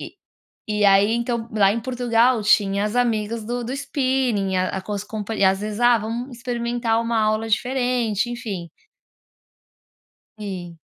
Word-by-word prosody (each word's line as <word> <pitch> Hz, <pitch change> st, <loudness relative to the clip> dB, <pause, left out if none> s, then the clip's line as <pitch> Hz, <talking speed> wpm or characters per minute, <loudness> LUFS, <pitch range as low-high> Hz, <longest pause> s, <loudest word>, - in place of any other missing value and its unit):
E -, -, -9 dB, 0.5 s
e 210 Hz, -1 st, +1 dB
aí, 200 Hz, +3 st, +5 dB
então, 235 Hz, -1 st, -2 dB
lá 200 Hz, -2 st, +4 dB
em 230 Hz, -, -2 dB
Portugal, 245 Hz, -1 st, +2 dB
tinha 200 Hz, -1 st, +3 dB
as 215 Hz, +3 st, -3 dB
amigas 225 Hz, -2 st, 0 dB
do 240 Hz, +1 st, -3 dB
do 250 Hz, +3 st, -4 dB
spinning, 260 Hz, -8 st, 0 dB
a 185 Hz, 0 st, +1 dB
às 205 Hz, +1 st, -4 dB
comp 215 Hz, 0 st, -6 dB
às 195 Hz, -2 st, +2 dB
vezes: 210 Hz, +1 st, -4 dB
"Ah, 240 Hz, -1 st, +5 dB
vamos 235 Hz, +4 st, -5 dB
experimentar 235 Hz, -1 st, -1 dB
uma 230 Hz, -1 st, 0 dB
aula 215 Hz, +1 st, 0 dB
diferente." 245 Hz, -2 st, 0 dB
Enfim. 210 Hz, -8 st, -5 dB, 1.7 s
Sim. 180 Hz, -5 st, -7 dB
225 Hz, 145 wpm, -22 LUFS, 205-240 Hz, 1.7 s, aí